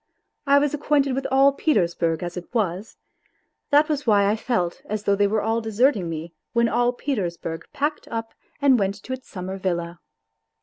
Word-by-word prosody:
I 280 0 +6
was 290 0 +2
acquainted 285 -2 +1
with 270 +1 -2
all 270 +1 +5
Peters 185 - +1
burg 165 0 -1
as 175 0 -5
it 180 -1 -8
was; 200 -1 -2 0.7
that 295 +1 +5
was 295 -4 -2
why 205 -2 +5
I 210 - +2
felt 215 -7 -2
as 210 0 -4
though 200 - +2
they 205 0 +3
were 215 +1 0
all 225 +1 0
deserting 220 -3 +1
me 165 +1 -6 0.2
when 235 -1 +3
all 245 +1 +2
Petersburg 180 - -3
packed 295 +1 -2
up 225 -1 -5 0.3
and 275 -4 +4
went 195 0 0
to 260 - -5
its 260 0 -8
summer 190 0 -5
villa. 170 -2 -2
220 Hz, 185 wpm, -23 LUFS, 180-270 Hz, 0.7 s, I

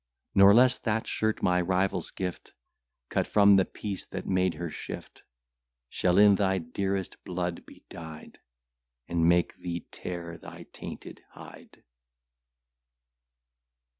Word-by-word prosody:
Nor 100 +1 +7
less 125 +1 +5
that 115 0 -1
shirt, 110 0 -1
my 90 0 +3
rival's 90 -1 0
gift, 90 -2 -6 0.6
Cut - - 0
from 100 -1 +6
the 95 -1 +4
piece 100 -3 -5
that - - -6
made 95 -2 +1
her 85 0 -5
shift, - - -8 0.7
Shall 90 0 +1
in 105 0 +7
thy 95 -1 +1
dearest 95 +2 -3
blood 90 -1 -4
be - - -16
dyed, 80 -2 -10 0.7
And 85 -1 +2
make 85 0 +2
thee 85 -2 -5
tear 85 -2 -6
thy - - -11
tainted - - -9
hide. - - -14
90 Hz, 125 wpm, -28 LUFS, 85-100 Hz, 0.7 s, Nor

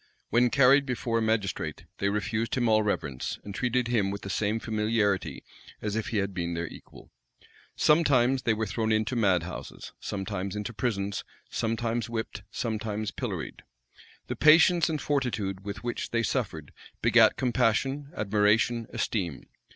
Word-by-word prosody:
When 120 +2 +4
carried 140 +2 +5
before 120 -2 -1
a - - -1
magistrate, 100 -8 -1
they 100 - +1
refused 110 +2 -1
him 125 -2 +1
all 110 -1 +4
reverence, 70 -11 -2
and 100 - -7
treated 125 +2 0
him 110 -5 +1
with 100 +1 -4
the 100 - -4
same 105 +3 0
familiarity 105 -3 0 0.4
as 105 -1 -3
if 110 - -2
he 115 - -2
had 100 -1 -1
been 85 -2 -2
their 85 +1 -2
equal. - - -13 0.6
Sometimes 135 -5 +4
they 110 -3 +1
were 110 +1 -1
thrown 110 +2 -1
into 110 +3 +1
mad 95 -7 +3
houses, 90 - -8
sometimes 100 -1 -4
into 105 +3 -4
prisons; 100 -2 -2 0.3
sometimes 115 0 -1
whipped, 110 -3 -4
sometimes 110 -2 -3
pilloried. - - -5 0.6
The - - -4
patience 165 +3 +6
and 155 -2 -1
fortitude 110 -10 -1
with 100 +2 -6
which 120 0 -3
they 115 0 0
suffered, 90 - -2 0.3
begat - - +5
compassion, 135 +4 +1
admiration, 105 +3 +2
esteem. 90 - -2
110 Hz, 150 wpm, -28 LUFS, 100-120 Hz, 0.6 s, patience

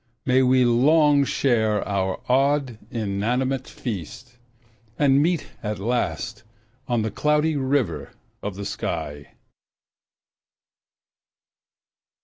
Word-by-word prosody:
May 130 0 +4
we 130 0 +4
long 145 +4 +4
share 110 -7 +1
our 95 -2 -1
odd, 135 -2 +1
inanimate 120 +5 -1
feast, 110 - -7 0.6
And 140 -1 +4
meet 165 0 0
at 105 -1 -3
last 120 +5 -2 0.5
on 120 -3 +1
the 110 - -2
Cloudy 150 +5 +1
River 130 - -1 0.3
of 100 -2 -4
the 100 +1 -6
sky. 75 -6 -5
125 Hz, 95 wpm, -23 LUFS, 105-140 Hz, 0.6 s, May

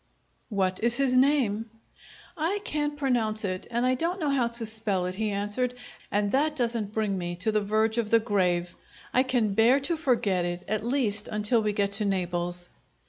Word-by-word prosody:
"What 190 -3 0
is 235 +1 +2
his 270 -2 +2
name?" 255 -5 +2 0.7
"I 335 +5 0
can't 295 -1 -1
pronounce 230 -6 0
it, 185 -1 -4
and 240 +1 0
I 255 - +3
don't 340 +8 -1
know 300 -4 0
how 255 -4 +2
to 235 0 -1
spell 215 -4 -1
it," 180 - -3
he 215 +3 -2
answered. 205 +5 -2 0.3
"And 205 0 0
that 300 +3 +1
doesn't 230 -4 -1
bring 215 -2 -1
me 175 0 -4
to 180 +6 0
the 215 0 +1
verge 220 +2 +1
of 220 -2 -1
the 230 - +6
grave! 180 -5 0 0.4
I 255 - +5
can 245 -6 +1
bear 230 +6 +5
to 320 +5 0
forget 235 - +1
it, 175 0 -3
at 215 +1 -1
least 230 -5 0
until 210 +2 +1
we 210 -1 0
get 200 -1 0
to 210 +1 0
Naples!" 175 -2 -1
220 Hz, 195 wpm, -27 LUFS, 200-255 Hz, 0.7 s, the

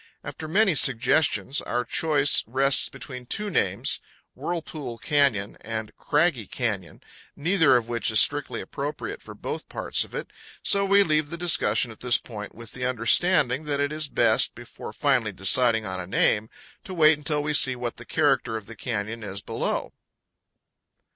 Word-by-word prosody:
After 155 - -7
many 195 +3 +3
suggestions 135 +1 +2
our 120 0 -2
choice 145 +2 +3
rests 135 +3 +3
between 125 -1 -10
two 210 - -2
names, - - 0 0.3
Whirlpool 155 -8 -5
Canyon 125 -5 0
and 110 -1 -6
Craggy 150 - 0
Canyon, 105 -8 -4 0.3
neither 160 -4 +3
of 115 -2 -3
which 120 -1 -1
is 110 -2 +5
strictly 145 +4 +1
appropriate 145 +1 -6
for - - -12
both - - -6
parts - - 0
of - - -12
it; - - -6 0.3
so 200 0 +3
we 200 +1 +5
leave 155 -3 0
the 170 - -6
discussion 125 -9 +2
at 110 - -14
this 125 -1 +3
point, 105 -3 -9
with 115 0 -10
the 130 - -7
understanding 130 +3 +2
that 145 -1 -2
it 145 0 0
is 155 0 -2
best, 115 -4 +2
before 120 -2 -10
finally 125 -3 +1
deciding 110 +4 +2
on 95 -1 -4
a 90 - -6
name, 105 +3 +1 0.3
to 185 - -8
wait 155 -2 +5
until 150 0 -1
we 150 0 -1
see 130 -3 +4
what 120 -1 -5
the - - -9
character 115 - +1
of 110 - -9
the 115 - -11
canyon 115 -1 -4
is 100 -2 -5
below. - - -3
130 Hz, 165 wpm, -25 LUFS, 115-150 Hz, 0.3 s, is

